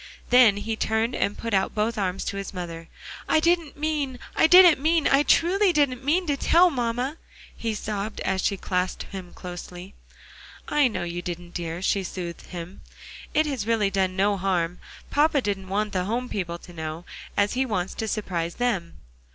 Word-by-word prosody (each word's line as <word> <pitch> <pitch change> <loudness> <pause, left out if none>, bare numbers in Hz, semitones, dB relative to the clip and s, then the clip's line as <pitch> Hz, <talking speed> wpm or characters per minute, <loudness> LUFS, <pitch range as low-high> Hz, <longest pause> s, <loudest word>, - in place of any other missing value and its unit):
Then 245 -5 +7
he 220 +2 -3
turned 220 +2 0
and 200 - -1
put 230 -1 -4
out 190 -1 +1
both 220 +2 0
arms 195 -3 -2
to 200 - -3
his 195 0 -6
mother. 165 -2 -6 0.4
"I - - +4
didn't 335 -2 +1
mean 290 -4 -1 0.2
I - - +5
didn't 355 -4 +8
mean 320 +1 +3
I 275 +1 +5
truly 370 +6 +3
didn't 280 -5 +1
mean 335 +7 +2
to 290 -3 0
tell 345 +5 +4
mamma," 250 +3 -2 0.4
he 225 -2 -3
sobbed, 210 0 -4
as 190 0 0
she 200 - +1
clasped 180 -1 -2
him 190 -3 -7
closely. 180 +1 -9 0.7
"I 295 -2 +3
know 220 - -3
you 175 0 -4
didn't, 175 0 -6
dear," 170 +1 -4
she 195 0 +1
soothed 175 -2 -6
him. 175 +1 -8 0.5
"It 310 +1 +4
has 265 -8 -3
really 215 -4 +2
done 190 -1 0
no 200 +1 +2
harm; 180 -2 -1 0.3
papa 295 0 +3
didn't 195 -5 -3
want 210 +1 -1
the 180 -1 0
home 245 +4 -2
people 170 -4 -3
to 175 +1 -14
know, 160 +1 -6 0.3
as 205 0 +2
he 260 +1 +1
wants 190 -8 -2
to 220 - -4
surprise 175 -6 -2
them." 205 -9 -1
205 Hz, 185 wpm, -25 LUFS, 180-265 Hz, 0.7 s, didn't